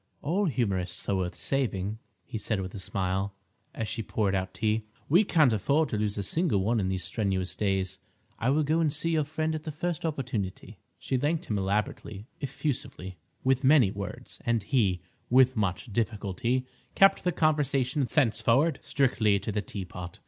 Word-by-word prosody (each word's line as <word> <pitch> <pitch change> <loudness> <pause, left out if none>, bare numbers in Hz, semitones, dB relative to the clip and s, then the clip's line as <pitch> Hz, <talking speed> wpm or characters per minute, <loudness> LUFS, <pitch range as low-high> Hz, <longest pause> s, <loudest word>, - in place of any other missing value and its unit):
"All 185 +8 +1
humorists 100 - -1
are 100 - +2
worth 90 -2 -2
saving," 110 -6 -1 0.3
he 110 - -5
said 105 0 -1
with 95 -1 -5
a 100 - -6
smile, 95 +1 -1 0.4
as 110 - -2
she 115 +4 -3
poured 105 -2 0
out 95 -1 -1
tea. 110 +3 0 0.2
"We 175 +8 +5
can't 155 - +4
afford 140 +8 +2
to 110 - -1
lose 105 0 -1
a 100 - -1
single 125 - +1
one 115 +3 +2
in 95 -2 0
these 95 -2 -2
strenuous 95 -4 -1
days. 95 -2 -1 0.4
I 115 - +1
will 150 +3 +3
go 155 +3 +2
and 160 -3 +2
see 160 +3 -1
your 155 -2 +2
friend 155 +1 -1
at 155 - -3
the 155 - -4
first 165 +2 -3
opportunity." 125 - -3 0.2
She 130 - -1
thanked 155 +6 0
him 105 -7 -1
elaborately, 100 +1 -2
effusively, 120 - -4 0.2
with 130 +1 +2
many 130 -7 +6
words, 100 0 -7
and 115 -3 +1
he, 100 - +1 0.3
with 130 +1 +5
much 100 +1 -2
difficulty, 115 +3 -1 0.3
kept 195 0 +5
the 180 - +2
conversation 145 -4 +1
thenceforward 130 +5 +3
strictly 110 -7 +2
to 105 - -4
the 105 0 -1
teapot. 90 -3 -7
115 Hz, 175 wpm, -28 LUFS, 100-145 Hz, 0.4 s, many